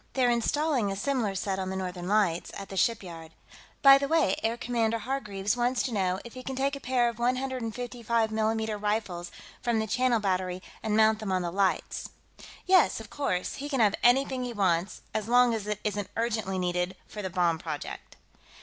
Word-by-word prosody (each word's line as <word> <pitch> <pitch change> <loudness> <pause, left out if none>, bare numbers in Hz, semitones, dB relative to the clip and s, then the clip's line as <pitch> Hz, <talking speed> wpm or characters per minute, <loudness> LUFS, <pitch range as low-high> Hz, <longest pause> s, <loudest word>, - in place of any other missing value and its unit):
They're 250 -2 +3
installing 245 -1 +1
a - - -3
similar 225 -2 -1
set 195 0 -2
on 185 0 -3
the 190 - -3
Northern 180 -1 -4
Lights 195 -5 +1
at 195 - -8
the 195 - -7
shipyard. 175 -7 -1 0.5
By 275 0 +9
the 280 - -1
way, 315 -11 +3
Air 230 +1 0
Commodore 230 -2 0
Hargreaves 210 -4 -2
wants 245 +1 +1
to 250 - -3
know 190 -2 0
if 235 - -10
he 255 - -8
can 265 +1 -5
take 275 +2 0
a - - -7
pair 250 -2 +1
of 235 -1 -4
155 240 -2 -1
mm 220 -1 -1
rifles 205 -5 -2 0.3
from 240 -2 +1
the 220 - 0
Channel 245 +1 +2
Battery 185 -2 -1 0.2
and 215 -1 0
mount 220 0 +4
them 215 -3 -3
on 185 -1 +1
the 170 - -2
Lights." 195 +1 0 0.6
"Yes, 370 -8 +4
of 220 -2 -11
course, 185 -11 -2
he 285 +2 -5
can 270 -3 -1
have 210 -3 +4
anything 260 +1 +3
he 245 -1 -4
wants, 185 -3 0
as 215 0 -2
long 245 0 +5
as 215 -2 -3
it 210 -1 -2
isn't 205 -2 -2
urgently 220 -4 -1
needed 180 0 -1
for 210 - -7
the 190 - -3
bomb 175 -3 +1
project." 155 -3 -6
220 Hz, 195 wpm, -28 LUFS, 190-245 Hz, 0.6 s, By